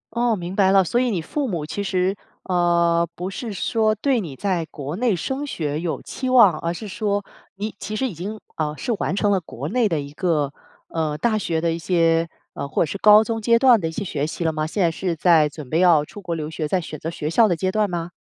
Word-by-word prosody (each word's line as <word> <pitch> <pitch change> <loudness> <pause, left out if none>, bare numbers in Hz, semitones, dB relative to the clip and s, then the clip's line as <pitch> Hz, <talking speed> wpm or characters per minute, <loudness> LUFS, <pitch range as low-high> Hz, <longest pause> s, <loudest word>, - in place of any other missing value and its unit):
哦， 235 -2 +2
明 180 +1 -6
白 190 -2 +4
了， 195 -1 +5
所 235 +8 +1
以 250 -1 +1
你 185 -7 -1
父 275 - -2
母 165 -6 -3
其 200 +6 -4
实， 190 0 0 0.3
呃， 170 -2 +2
不 180 +2 -5
是 230 +3 -5
说 215 +2 +1
对 245 +2 +1
你 150 -8 -7
在 180 -2 -1
国 145 0 -6
内 230 -4 +1
升 265 - -3
学 150 - -3
有 170 -2 -3
期 260 - -5
望， 210 -11 +6
而 170 +1 -2
是 215 - -7
说 205 0 -2 0.3
你 210 +2 -4
其 215 +2 -5
实 265 - 0
已 230 - -4
经， 195 +7 -6 0.2
啊， 150 -1 -1
是 245 - -2
完 - - -1
成 205 0 +2
了 190 - +2
国 145 -3 -7
内 245 -3 +2
的 165 -5 0
一 140 0 -9
个， 150 -4 0 0.4
呃， 155 -2 -2
大 215 +7 +1
学 165 -5 -1
的 170 - +1
一 165 - -3
些， 165 -1 +2 0.2
呃， 140 - -5
或 - - +1
者 - - -3
是 200 - -4
高 210 +1 +7
中 225 0 -2
阶 230 +1 +4
段 245 -5 +6
的 165 - -1
一 - - -4
些 200 +5 -4
学 150 -4 -2
习 170 - -4
了 160 - +1
吗？ 155 0 -2
现 190 +5 -1
在 170 - +3
是 175 0 -3
在 160 -2 +4
准 145 -3 -10
备 160 - +1
要 170 -4 +5
出 205 - -11
国 170 -3 -4
留 155 -1 -4
学， 155 -1 -3
在 190 - +1
选 155 -3 -6
择 165 - -4
学 155 -2 -3
校 220 +5 +5
的 175 - +1
阶 185 +3 -1
段 215 0 +1
吗？ 170 -1 -4
180 Hz, 275 characters per minute, -22 LUFS, 160-210 Hz, 0.4 s, 高